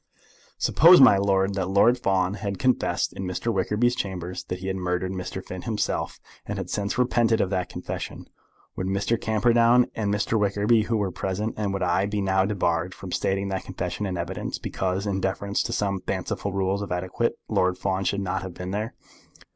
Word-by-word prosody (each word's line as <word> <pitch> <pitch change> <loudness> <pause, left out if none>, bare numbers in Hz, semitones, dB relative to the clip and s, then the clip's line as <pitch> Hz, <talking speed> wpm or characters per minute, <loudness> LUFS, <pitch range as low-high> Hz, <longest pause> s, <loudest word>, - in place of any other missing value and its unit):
"Suppose, 175 +3 +7
my 125 -7 +8
lord, 95 0 +2
that 95 -2 -2
Lord 100 +5 +5
Fawn 95 -5 +1
had 100 -1 -4
confessed 130 +3 +1
in 95 - -6
Mr. 95 +5 -2
Wickerby's 105 +5 +1
chambers 90 -2 -4
that 90 - -4
he 95 - -9
had 95 0 -1
murdered 90 0 -1
Mr. 95 0 -5
Bonteen 90 -1 -6
himself, 110 -2 -2 0.2
and - - -5
had - - -5
since 100 -1 -2
repented 120 -2 +2
of 95 - 0
that 90 -2 -1
confession, - - -6 0.5
would 95 - -3
Mr. 100 +4 0
Camperdown 120 +2 +4
and 105 -2 -1
Mr. 105 +2 +1
Wickerby, 105 +2 +2
who 115 0 0
were 100 -3 -1
present, 100 +5 -2
and 105 -2 -1
would 95 -1 -2
I, 90 +2 +2
be 105 0 -2
now 95 -1 +2
debarred 90 -3 0
from 95 -2 -9
stating 100 +2 0
that 95 -1 -3
confession 105 - -3
in 90 -2 -3
evidence, 85 +2 -4
because, 95 +1 -2
in 95 -2 -1
deference 100 +1 -1
to - - -3
some 100 -2 -1
fanciful 95 +2 -3
rules 95 +1 0
of 100 - -5
etiquette, 90 +1 -1
Lord 90 0 +1
Fawn 95 0 -1
should 100 0 0
not 95 -2 -2
have 95 -2 -7
been 90 0 -5
there?" 105 +3 -3
100 Hz, 195 wpm, -25 LUFS, 95-105 Hz, 0.5 s, my